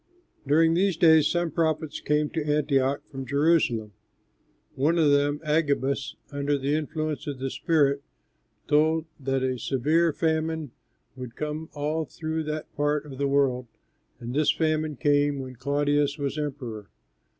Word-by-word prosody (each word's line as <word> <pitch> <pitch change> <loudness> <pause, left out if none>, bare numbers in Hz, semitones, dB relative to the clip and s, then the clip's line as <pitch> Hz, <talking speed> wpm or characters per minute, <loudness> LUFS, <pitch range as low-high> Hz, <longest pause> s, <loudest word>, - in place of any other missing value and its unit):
During 160 +3 +4
these 185 0 +2
days 160 -4 +6
some 175 -1 0
prophets 155 -1 -1
came 150 0 0
to 160 -3 -2
Antioch 140 -2 +1
from 135 -1 -5
Jerusalem. 135 -6 +1 0.8
One 155 +6 +1
of 155 -3 +4
them, 145 +1 +2
Agabus, 140 -4 0 0.2
under 145 0 0
the 140 +1 -1
influence 155 0 -2
of 145 -2 -4
the 130 0 -3
Spirit, 140 -4 +2 0.7
told 155 +2 +3
that 135 -1 -1
a 130 -1 -1
severe 155 +8 +2
famine 160 -2 -1 0.4
would 125 -2 -8
come 150 +1 -4
all 155 +2 -1
through 160 +2 -4
that 155 0 -5
part 145 +1 0
of 135 -3 -10
the 140 - +1
world, 135 -3 +1 0.5
and 120 +1 -6
this 150 +2 +3
famine 155 -1 0
came 145 +2 +2
when 130 -2 -7
Claudius 145 +2 +1
was 140 -1 -2
emperor. 130 -9 -5
145 Hz, 145 wpm, -26 LUFS, 140-155 Hz, 0.8 s, days